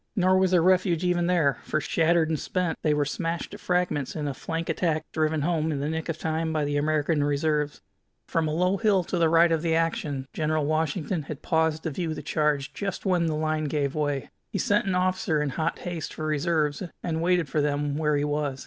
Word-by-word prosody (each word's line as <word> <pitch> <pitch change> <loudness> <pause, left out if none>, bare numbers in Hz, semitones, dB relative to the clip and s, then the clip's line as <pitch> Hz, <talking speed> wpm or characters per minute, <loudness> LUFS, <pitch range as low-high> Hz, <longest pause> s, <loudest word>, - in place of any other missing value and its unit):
Nor 185 -1 +4
was 190 -1 +3
there 175 -2 +4
refuge 180 -2 +3
even 175 -1 +1
there, 165 -6 +2
for, 155 - -1
shattered 165 +1 +2
and 155 -2 -1
spent, 180 -3 -2
they 155 - +2
were 150 -1 +2
smashed 165 +4 -3
to - - -9
fragments 180 -6 -1
in 150 -2 -2
a 140 - -2
flank 165 +5 -4
attack 165 -1 0
driven 155 -1 +1
home 160 -1 0
in 145 - -2
the 145 +2 -2
nick 160 +1 -3
of 160 - -2
time 160 0 -1
by 155 -2 0
the 145 0 -1
American 150 +1 +1
reserves. 145 0 0 0.5
From 165 -1 0
a - - -1
low 180 +5 +1
hill 200 -3 +3
to 175 +1 -2
the 165 -1 +4
right 165 +1 +5
of 165 -1 +2
this 165 -1 +1
action 155 -4 -1
General 155 -1 0
Washington 155 +2 -1
had 150 0 -8
paused 160 -2 +1
to 160 - -2
view 160 +1 -3
the - - -7
charge 150 -2 0
just 195 -1 -4
when 180 -2 +2
his 165 -1 +1
line 155 0 -1
gave 145 -2 -1
way. 145 -3 -2 0.2
He - - -2
sent 205 0 +1
an 190 - +1
officer 185 -2 +1
in 150 -1 0
hot 160 +4 -1
haste 175 -3 -5
for 155 - -4
reserves, 155 -1 0 0.2
and 165 -2 -1
waited 175 -2 +2
for 150 +2 0
them 145 0 0
where 150 -1 +1
he 145 - 0
was. 145 -2 -1
160 Hz, 225 wpm, -26 LUFS, 150-170 Hz, 0.5 s, right